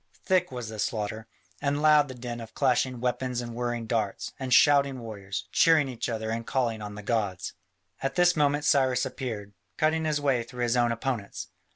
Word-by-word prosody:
Thick 180 -4 +2
was 125 -3 -5
the 110 -1 -7
slaughter, 110 +1 -2 0.3
and 145 0 0
loud 150 -1 +5
the 130 - -8
din 120 -1 -6
of 115 - -11
clashing 130 -2 +1
weapons 125 0 -1
and 120 -1 -5
whirring 120 -1 -2
darts, 110 -3 -2
and 130 -1 -4
shouting 140 +1 +5
warriors, 100 -4 -6
cheering 160 -4 +5
each 125 -2 -4
other 110 -1 -3
and 115 +1 -2
calling 115 -3 -1
on 105 0 -6
the 105 - -8
gods. 100 -5 -1 0.5
At 135 0 -2
this 175 0 +4
moment 145 -1 +2
Cyrus 130 -3 +3
appeared, 115 -6 -5 0.2
cutting 160 +1 +1
his 155 -1 +1
way 135 -4 +2
through 120 +1 -5
his 120 0 +1
own 120 -1 +3
opponents. 115 -3 -3
125 Hz, 190 wpm, -27 LUFS, 115-140 Hz, 0.5 s, loud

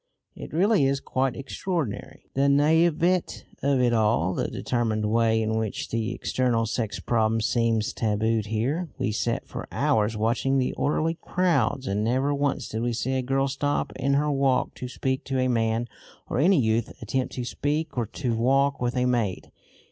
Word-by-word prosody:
It - - -9
really 190 -1 +3
is 135 0 +1
quite 130 -2 -1
extraordinary, 140 - -4
the 135 +1 +2
naïveté 165 +5 +2 0.2
of 140 -1 +2
it 120 -1 +3
all, 105 -5 +2
the - - -1
determined 110 -3 -1
way 110 +1 +2
in 110 0 0
which 110 -2 -3
the 115 0 -2
eternal 120 -3 0
sex 110 -2 -2
problem 115 -1 +1
seems 115 -1 +1
tabooed 110 0 0
here. 135 +11 -1
We 130 -4 -1
sat 115 +2 -2
for - - -7
hours 110 0 +1
watching 120 +5 +1
the 130 -1 0
orderly 160 +3 0
crowds, 175 -7 +1
and 105 -2 -1
never 130 +5 +1
once 140 0 -1
did 110 - -4
we 120 0 0
see 125 +3 -2
a 130 - +1
girl 135 +2 0
stop 145 +1 -1
in 135 +1 +1
her 150 +1 +1
walk 135 -2 +1
to 125 - -5
speak 130 +1 -2
to 135 -1 -2
a 130 - +2
man 115 -1 0 0.4
or - - -2
any 180 +4 +4
youth 115 0 0
attempt 130 +4 -2
to 125 - -3
speak 150 +5 -2
or 120 -3 -1
to 120 0 -2
walk 135 +4 +2
with 120 +1 -1
a 125 - +2
maid. 115 -7 -1
125 Hz, 180 wpm, -26 LUFS, 115-140 Hz, 0.4 s, any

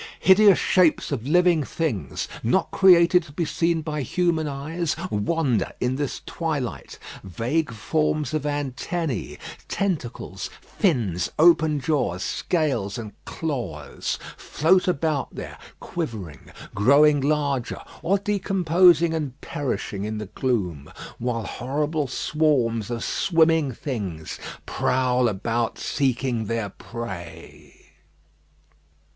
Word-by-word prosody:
Hideous 195 0 +6
shapes 180 -5 +3
of 130 -3 -3
living 175 -1 +4
things, 120 - -3
not 125 +12 +1
created 180 -2 +6
to 150 - -14
be 165 +3 -2
seen 165 +1 0
by 150 -1 -3
human 160 +3 0
eyes, 150 +4 -2 0.2
wander 125 +1 0
in 125 +1 0
this 145 -1 -3
twilight. 150 -7 -4 0.3
Vague 120 - -1
forms 150 +4 -1
of 155 - 0
antennæ, 145 - -3 0.3
tentacles, 125 - -3
fins, 115 - 0
open 160 -2 +5
jaws, 130 - 0
scales, 135 - -1
and 110 -3 -6
claws, 120 - -4 0.2
float 180 +5 +2
about 155 -4 0
there, - - -7 0.2
quivering, 110 - -6 0.2
growing 140 +7 +5
larger, 140 -3 0 0.2
or 190 +5 +2
decomposing 180 -4 +3
and 150 -4 -3
perishing 115 -9 -3
in 110 +1 -3
the 105 - -4
gloom, 95 - -2 0.3
while 115 -1 -2
horrible 145 +7 -2
swarms 125 -6 +1
of 120 -1 -3
swimming 160 -5 +2
things 100 - -5 0.3
prowl 125 -1 +1
about 115 +3 -1
seeking 130 -4 -1
their 115 -2 -2
prey. 95 -6 -9
140 Hz, 105 wpm, -24 LUFS, 115-165 Hz, 0.3 s, Hideous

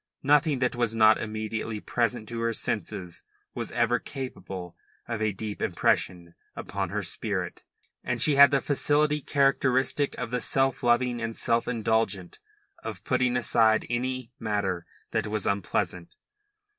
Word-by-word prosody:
Nothing 145 +1 +4
that 125 -1 0
was 120 -2 0
not 110 -1 +6
immediately 110 0 -4
present 120 0 -1
to 115 -1 -4
her 115 0 0
senses 95 -5 -3 0.3
was - - -5
ever 120 +1 +2
capable 95 - -7 0.3
of 115 -2 -3
a 110 -1 +2
deep 105 +1 -6
impression 85 -2 0 0.2
upon - - -4
her - - -2
spirit, - - -3 0.4
and - - -2
she 150 - +4
had 140 0 +9
the 140 -1 +2
facility 150 +1 +2
characteristic 135 0 +1
of 115 - -4
the 125 -1 -1
self 135 0 +2
loving 120 0 +2
and 115 0 -4
self 115 -1 +1
indulgent 110 -5 -1 0.4
of - - -6
putting 125 -1 +1
aside 110 -2 +3
any 130 0 -2
matter 100 -5 -2 0.2
that - - 0
was 105 -1 -2
unpleasant. 90 -3 -2
115 Hz, 145 wpm, -27 LUFS, 110-130 Hz, 0.4 s, had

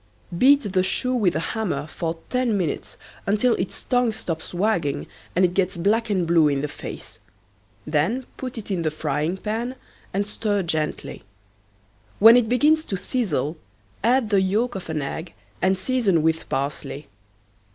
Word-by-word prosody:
Beat 260 -1 +4
the 185 - +4
shoe 255 +7 0
with 205 -8 +2
a - - +1
hammer 185 -11 -2
for 165 +1 -4
ten 250 -4 +1
minutes 170 -6 -3 0.3
until 215 +5 +3
its - - -4
tongue 245 -2 +2
stops 165 -7 -5
wagging 175 -6 0 0.3
and 185 +1 +5
it 175 - 0
gets 185 -2 0
black 220 +6 +1
and 185 -4 +1
blue 165 -2 +4
in 140 -2 +1
the 150 - -1
face. - - -8 0.7
Then 165 - 0
put 255 -2 -6
it 215 -2 -6
in 180 -3 0
the 160 - +1
frying 155 +3 -2
pan 225 +5 -3 0.4
and 200 +2 0
stir 205 -1 -1
gently. 160 -2 -2 1.0
When 225 +3 +9
it 240 -3 +3
begins 300 +6 +4
to 195 - -2
sizzle 175 - -1 0.5
add 240 -1 +3
the 200 -2 +4
yolk 215 +6 +1
of 185 -4 -7
an 155 -2 -1
egg 160 +5 -5 0.3
and 190 0 +3
season 195 -6 +1
with 160 0 0
parsley. 140 +1 -3
190 Hz, 160 wpm, -23 LUFS, 160-230 Hz, 1.0 s, When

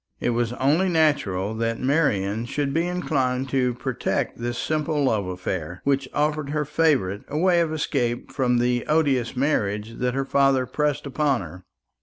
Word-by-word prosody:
It 120 - 0
was 120 -1 0
only 150 +9 +2
natural 125 - +1
that 115 0 -1
Marian 115 -7 +1
should 140 +2 -2
be 165 +2 +1
inclined 135 -7 -1
to 125 -2 +1
protect 125 -1 -2
this 120 0 -3
simple 155 -1 0
love 110 -7 +1
affair, 90 -2 -4
which 135 -1 0
offered 150 -1 0
her 150 0 -1
favourite 135 - +1
a 150 - -4
way 175 +1 +4
of 165 -2 0
escape 125 -6 -1
from 130 -2 +1
the 120 0 +1
odious 140 -6 +1
marriage 110 -6 -1
that 125 0 0
her 135 0 0
father 135 -1 +3
pressed 145 +3 -1
upon 140 -2 0
her. 90 +1 -10
130 Hz, 165 wpm, -24 LUFS, 115-150 Hz, -, way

